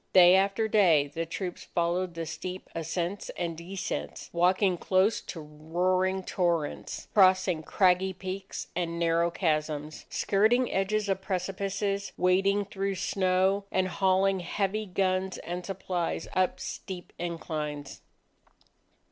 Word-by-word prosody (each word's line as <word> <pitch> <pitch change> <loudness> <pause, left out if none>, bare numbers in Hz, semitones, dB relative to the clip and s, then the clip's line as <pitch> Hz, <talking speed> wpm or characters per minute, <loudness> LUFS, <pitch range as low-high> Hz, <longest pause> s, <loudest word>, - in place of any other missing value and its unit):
Day 180 -1 +8
after 195 +3 +2
day, 180 -9 +5
the 165 +1 -3
troops 180 +1 -5
followed 175 +1 -1
the 165 0 -3
steep 180 +4 -6
ascents 170 +4 -3
and 170 -2 -2
descents, 180 +4 -5
walking 185 +2 +3
close 190 +4 +2
to 170 - -7
roaring 180 +5 0
torrents, 170 -5 -1
crossing 185 -4 +4
craggy 185 +3 +3
peaks 190 +1 -6
and 170 -1 -2
narrow 170 0 +2
chasms, 155 -3 -2
skirting 220 +5 +2
edges 205 +2 0
of 195 -1 0
precipices, 195 +1 -2
wading 195 +3 +3
through 195 0 -2
snow, 190 +1 +1
and 185 0 +1
hauling 190 +1 +2
heavy 200 +4 -2
guns 185 0 0
and 175 +1 -5
supplies 180 -3 -2
up 185 -1 +1
steep 180 -2 -7
inclines. 155 -4 -4
185 Hz, 120 wpm, -28 LUFS, 170-195 Hz, -, Day